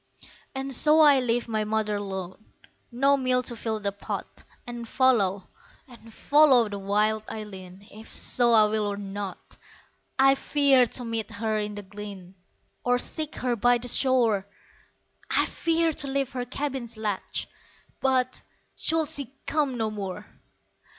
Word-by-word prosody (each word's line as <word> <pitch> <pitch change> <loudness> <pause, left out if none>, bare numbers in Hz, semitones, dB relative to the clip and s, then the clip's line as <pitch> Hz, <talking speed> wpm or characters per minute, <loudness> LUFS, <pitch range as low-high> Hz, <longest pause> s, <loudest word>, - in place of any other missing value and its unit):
And 270 0 -3
so 305 +5 +5
I 290 -3 +7
leave 245 -1 0
my 215 -2 -1
mother 215 -1 -1
lone, 190 +1 -7 0.4
No 275 +4 +3
meal 255 -1 +1
to 240 -1 -3
fill 220 -1 -3
the 200 -1 -1
pot, 200 - -7 0.2
And 240 -1 -7
follow, 205 -8 +2 0.6
follow 255 -4 +4
wild 210 +2 +1
Eileen. 195 -2 -9
If 220 +2 -12
so 240 -1 +3
I 215 -2 +7
will 210 0 0
or 200 0 -3
not. 200 -1 -7 0.6
I 270 0 +6
fear 275 -2 +3
to 245 +2 -4
meet 225 -2 -3
her 215 0 -2
in 210 0 -4
the 205 - -7
glen, 195 -2 -10 0.5
Or 245 0 +2
seek 310 +4 -3
her 245 -1 -1
by 245 +2 +3
the 245 +1 -6
shore; 235 -6 +2 0.8
I - - +3
fear 330 -1 0
to 285 - -3
lift 275 -1 -2
her 250 -1 -3
cabin's 260 -3 -4
latch, 210 -3 -3 0.5
But 255 -1 +1 0.3
should 320 -1 0
she 280 -3 -1
come 290 -5 0
no 220 -1 -1
more! 205 -1 -6
230 Hz, 145 wpm, -26 LUFS, 210-265 Hz, 0.8 s, I